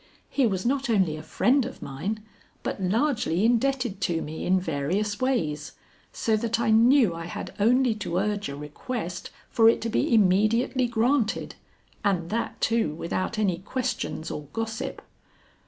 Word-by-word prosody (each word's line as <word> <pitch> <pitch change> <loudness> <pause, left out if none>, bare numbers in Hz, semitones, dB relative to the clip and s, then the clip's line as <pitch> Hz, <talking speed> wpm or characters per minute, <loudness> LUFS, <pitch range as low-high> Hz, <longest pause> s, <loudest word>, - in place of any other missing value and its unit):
He 270 -4 +3
was 190 -2 -2
not 270 +1 0
only 190 -8 +2
a 155 - -7
friend 250 - +2
of 260 - -7
mine 195 +11 -4 0.4
but - - -3
largely 215 - +1
indebted 245 -3 +1
to 170 -2 +1
me 155 +1 -5
in 185 +1 +4
various 185 +6 -1
ways, 160 - -1 0.4
so 220 - 0
that 230 +1 -1
I 230 -2 +2
knew 230 -2 +5
I 165 0 -6
had 175 - -6
only 245 +3 +4
to 185 -5 -3
urge 205 -2 -1
a 140 - -5
request 175 - -5 0.2
for 225 -1 +6
it - - +2
to 230 - -2
be - - 0
immediately 225 +5 +3
granted, 235 0 +1 0.5
and 180 -4 0
that, 230 +1 -2
too, 225 -10 +1
without 185 +6 -3
any 190 -5 +1
questions 235 -6 -3
or 150 -1 -6
gossip. 225 +4 -4
215 Hz, 155 wpm, -26 LUFS, 175-235 Hz, 0.5 s, for